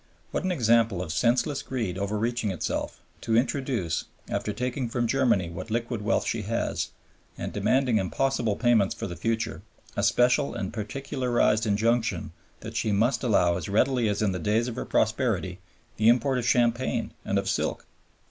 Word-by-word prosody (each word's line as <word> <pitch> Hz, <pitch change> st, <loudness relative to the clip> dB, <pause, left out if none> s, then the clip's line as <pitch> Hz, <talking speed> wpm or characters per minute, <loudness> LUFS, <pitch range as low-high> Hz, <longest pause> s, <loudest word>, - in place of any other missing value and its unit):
What -, -, -2 dB
an 185 Hz, -, 0 dB
example 115 Hz, -, +3 dB
of 80 Hz, -3 st, -5 dB
senseless 130 Hz, -, +1 dB
greed 120 Hz, -9 st, -3 dB
overreaching 105 Hz, +3 st, -1 dB
itself, 95 Hz, -, -3 dB, 0.2 s
to 110 Hz, 0 st, +1 dB
introduce, 120 Hz, -, 0 dB, 0.2 s
after 105 Hz, -, -2 dB
taking 125 Hz, +3 st, -2 dB
from 120 Hz, 0 st, 0 dB
Germany 115 Hz, -8 st, +2 dB
what 85 Hz, +6 st, -7 dB
liquid 115 Hz, 0 st, -2 dB
wealth 105 Hz, +3 st, +1 dB
she 115 Hz, -, -1 dB
has 115 Hz, +3 st, -2 dB, 0.5 s
and -, -, -5 dB
demanding 125 Hz, -4 st, +2 dB
impossible 115 Hz, +2 st, 0 dB
payments 115 Hz, -4 st, +3 dB
for -, -, -5 dB
the 90 Hz, -, -5 dB
future, 115 Hz, +5 st, -2 dB, 0.3 s
a -, -, 0 dB
special 125 Hz, +4 st, +3 dB
and 95 Hz, -, -4 dB
particularized 120 Hz, -1 st, 0 dB
injunction 115 Hz, +3 st, +1 dB, 0.3 s
that -, -, -8 dB
she 110 Hz, -, 0 dB
must 115 Hz, +8 st, +2 dB
allow 90 Hz, -7 st, +3 dB
as 90 Hz, -, -5 dB
readily 115 Hz, +2 st, +2 dB
as 105 Hz, +1 st, 0 dB
in 100 Hz, -, +2 dB
the 90 Hz, -, -3 dB
days 110 Hz, +6 st, +1 dB
of 120 Hz, -, -4 dB
her -, -, -4 dB
prosperity 105 Hz, -6 st, 0 dB, 0.4 s
the 110 Hz, +1 st, +5 dB
import 125 Hz, +2 st, +3 dB
of 120 Hz, -, -2 dB
champagne 120 Hz, +1 st, +1 dB
and -, -, 0 dB
of -, -, -1 dB
silk! -, -, -1 dB
115 Hz, 165 wpm, -27 LUFS, 105-125 Hz, 0.5 s, the